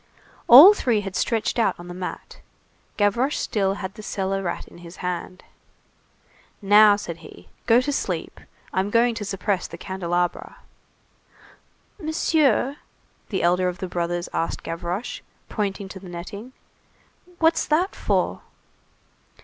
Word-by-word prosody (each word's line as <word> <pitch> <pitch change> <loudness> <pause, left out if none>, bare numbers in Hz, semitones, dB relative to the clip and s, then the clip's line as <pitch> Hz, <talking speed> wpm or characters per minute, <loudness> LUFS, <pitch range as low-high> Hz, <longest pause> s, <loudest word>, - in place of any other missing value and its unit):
All 290 - +11
three 240 - 0
had 195 -2 -7
stretched 230 +1 0
out 225 - +1
on 175 - -10
the 175 - -7
mat. 180 0 -7 0.6
Gavroche 235 +7 +1
still 195 -2 0
had 190 -1 -6
the 215 - -10
cellar 195 -2 -2
rat 175 -3 -4
in - - -15
his 170 0 -11
hand. 180 +1 -4 1.2
"Now," 205 +1 +6
said 175 -5 -6
he, 165 - -15 0.2
"go 235 0 +6
to 290 - -2
sleep! - - -3 0.3
I'm 190 +2 0
going 235 +2 +3
to 225 -2 -5
suppress 195 -1 -2
the - - -10
candelabra." 175 -2 -3 1.4
"Monsieur," 305 - +1 0.5
the 190 - -2
elder 180 +1 +2
of 180 0 -3
the 190 - -5
brothers 175 0 -2
asked 165 - -2
Gavroche, 175 +7 -4 0.3
pointing 200 -2 -3
to 190 - -9
the 185 -1 -11
netting, 200 +8 -8 0.8
"what's 325 0 +2
that 345 +6 +1
for?" - - -1
195 Hz, 135 wpm, -23 LUFS, 180-235 Hz, 1.4 s, All